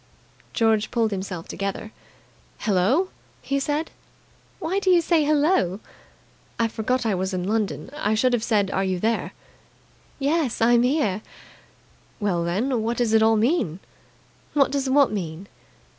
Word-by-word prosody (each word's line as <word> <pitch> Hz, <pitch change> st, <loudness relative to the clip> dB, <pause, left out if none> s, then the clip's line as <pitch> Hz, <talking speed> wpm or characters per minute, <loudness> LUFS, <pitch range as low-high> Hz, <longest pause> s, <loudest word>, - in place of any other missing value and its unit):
George 220 Hz, -2 st, +2 dB
pulled 230 Hz, -3 st, 0 dB
himself 190 Hz, -3 st, -5 dB
together. 200 Hz, +3 st, -4 dB, 0.7 s
"Hello!" 225 Hz, -, +2 dB, 0.3 s
he 275 Hz, 0 st, -1 dB
said. 295 Hz, +3 st, -2 dB, 0.7 s
"Why 370 Hz, +2 st, -1 dB
do 385 Hz, -, 0 dB
you 360 Hz, -2 st, +6 dB
say 335 Hz, -1 st, +2 dB
'Hello'?" 290 Hz, -, +2 dB, 0.8 s
"I 230 Hz, -, +2 dB
forgot 235 Hz, +3 st, -1 dB
I 220 Hz, -, +1 dB
was 190 Hz, +1 st, -2 dB
in 180 Hz, -, -2 dB
London. 215 Hz, +2 st, -2 dB
I 220 Hz, -8 st, 0 dB
should 250 Hz, +3 st, +2 dB
have 240 Hz, -, +1 dB
said 205 Hz, -4 st, +1 dB
'Are 195 Hz, -, 0 dB
you 185 Hz, -1 st, -1 dB
there?'" 225 Hz, +4 st, -1 dB, 0.8 s
"Yes, 285 Hz, -2 st, 0 dB
I'm 235 Hz, +1 st, +4 dB
here." 250 Hz, -7 st, +1 dB, 1.0 s
"Well, 190 Hz, -5 st, 0 dB
then, 225 Hz, +8 st, 0 dB
what 230 Hz, +2 st, -2 dB
does 235 Hz, -3 st, +1 dB
it 220 Hz, -, +5 dB
all 220 Hz, 0 st, +4 dB
mean?" 220 Hz, -, +1 dB, 0.8 s
"What 275 Hz, -2 st, +3 dB
does 275 Hz, -1 st, -1 dB
what 275 Hz, -2 st, +4 dB
mean?" 180 Hz, -3 st, -4 dB
225 Hz, 145 wpm, -24 LUFS, 200-275 Hz, 1.0 s, you